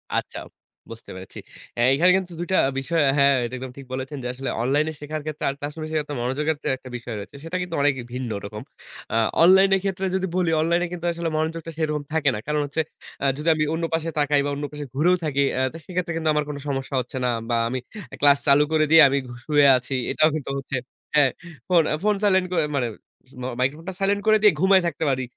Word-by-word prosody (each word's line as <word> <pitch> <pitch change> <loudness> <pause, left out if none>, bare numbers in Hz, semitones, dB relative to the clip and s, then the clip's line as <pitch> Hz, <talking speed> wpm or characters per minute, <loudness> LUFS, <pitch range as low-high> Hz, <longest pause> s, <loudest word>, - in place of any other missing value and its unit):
আচ্ছা, - - -3 0.5
বুঝতে 115 0 -10
পেরেছি। 95 0 -10 0.4
অ্যা 120 - +1
এখানে 175 +6 +4
কিন্তু 180 -2 -5
২ 175 - -3
টা - - +4 0.2
বিষয় 160 +4 0 0.2
হ্যাঁ, 140 0 +5
এটা 120 - -7
একদম 130 0 -7
ঠিক 135 - -9
বলেছেন, 135 +3 -4
যে - - -2
আসলে 135 +1 -4
অনলাইনে 145 +6 +1
শেখার 155 +1 -5
ক্ষেত্রে 155 -1 -5
আর - - -2
ক্লাসরুমে 150 +2 -5
শেখার 155 -2 -1
ক্ষেত্রে 145 -4 -4
এত - - -2
মনোযোগের 145 +5 -1
যে - - -1
একটা 130 - -12
বিষয় 120 -2 -7
রয়েছে। 100 +7 -9
সেটা 170 +3 -3
কিন্তু 180 -2 -4
অনেকই 140 -4 +1
ভিন্নরকম। 105 -4 -5 0.5
আ - - +1 0.3
অনলাইনের 190 +2 +6
ক্ষেত্রে 195 -1 -2
যদি 190 0 0
বলি 175 -3 +1
অনলাইনে 170 +2 +1
কিন্তু 175 -1 -6
আসলে 170 -1 -3
মনোযোগটা 165 +1 -3
সেরকম 150 -2 -1
থাকে 155 -3 +2
না। - - -4
কারণ 150 0 0
হচ্ছে 150 +3 -1 0.4
আ - - +1
যদি 150 - -5
আমি 155 - 0
অন্য 165 - -2
পাশে 165 0 -1
তাকাই 145 -1 +3
বা - - -1
অন্য 145 +1 -4
পাশে 150 -1 -6
ঘুরেও 175 +5 +4
থাকি 140 -2 0
অ্যা 130 - +1
তো - - -7
সেক্ষেত্রে 180 -1 -3
কিন্তু 160 -1 0
আমার 150 0 +1
কোন 145 - -4
সমস্যা 135 -1 -3
হচ্ছে 125 +2 -8
না। 125 - +2 0.2
বা 120 - +1
আমি 130 +1 -2 0.3
আ - - -5
ক্লাস 145 -1 +6
চালু 140 +1 +6
করে 155 -1 +3
দিয়ে 160 0 +9
আমি 140 - +1
ঘু 120 - -9
শুয়ে 145 -2 +4
আছি। 125 +2 -4 0.2
এটাও 155 - +4
কিন্তু 145 -3 -4
হচ্ছে 135 0 -5 0.4
হ্যাঁ, 140 -4 +5 0.4
ফোন, 175 -3 +5
আ - - +2
ফোন 210 0 +3
সাইলেন্ট 190 -2 +3
করে 165 -3 +2
মানে 125 -3 0 0.5
মো 125 - -3
মাইক্রোফোনটা 155 +8 -2
সাইলেন্ট 200 +1 +1
করে 215 0 +6
দিয়ে 210 -3 +6
ঘুমায়ে 190 0 +5
থাকতে 160 -1 -3
পারি। 130 -1 0
150 Hz, 225 wpm, -23 LUFS, 135-170 Hz, 0.5 s, দিয়ে